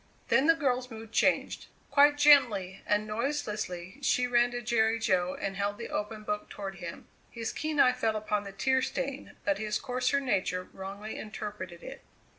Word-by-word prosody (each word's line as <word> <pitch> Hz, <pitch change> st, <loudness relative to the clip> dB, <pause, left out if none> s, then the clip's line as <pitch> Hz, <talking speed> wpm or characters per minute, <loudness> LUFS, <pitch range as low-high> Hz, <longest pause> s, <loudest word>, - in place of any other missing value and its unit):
Then 275 Hz, -, +4 dB
the 330 Hz, -, +6 dB
girl's 255 Hz, -5 st, 0 dB
mood 225 Hz, -1 st, -9 dB
changed. -, -, +1 dB, 0.2 s
Quite 290 Hz, +1 st, +6 dB
gently 235 Hz, -11 st, +5 dB
and 210 Hz, 0 st, +2 dB
noiselessly 215 Hz, -5 st, -3 dB
she 250 Hz, -2 st, +2 dB
ran 240 Hz, 0 st, +3 dB
to 245 Hz, 0 st, -5 dB
Jerry 225 Hz, -1 st, +2 dB
Jo 185 Hz, -4 st, +1 dB
and 195 Hz, -1 st, -4 dB
held 205 Hz, +1 st, -1 dB
the 235 Hz, -, -6 dB
opened 215 Hz, 0 st, -4 dB
book 315 Hz, +4 st, -3 dB
toward 195 Hz, -2 st, -6 dB
him. 175 Hz, -1 st, -8 dB, 0.2 s
His 230 Hz, -1 st, -4 dB
keen 310 Hz, -1 st, -2 dB
eye 250 Hz, -2 st, +6 dB
fell 225 Hz, -3 st, 0 dB
upon 210 Hz, -1 st, -1 dB
the 200 Hz, -, -8 dB
tear 260 Hz, +7 st, +1 dB
stain, 275 Hz, +2 st, -4 dB
but 200 Hz, -1 st, +1 dB
his 215 Hz, -1 st, -1 dB
coarser 255 Hz, +1 st, 0 dB
nature 190 Hz, -8 st, 0 dB
wrongly 200 Hz, +3 st, -7 dB
interpreted 205 Hz, -5 st, -7 dB
it. 270 Hz, +1 st, -9 dB
220 Hz, 175 wpm, -30 LUFS, 200-260 Hz, 0.2 s, the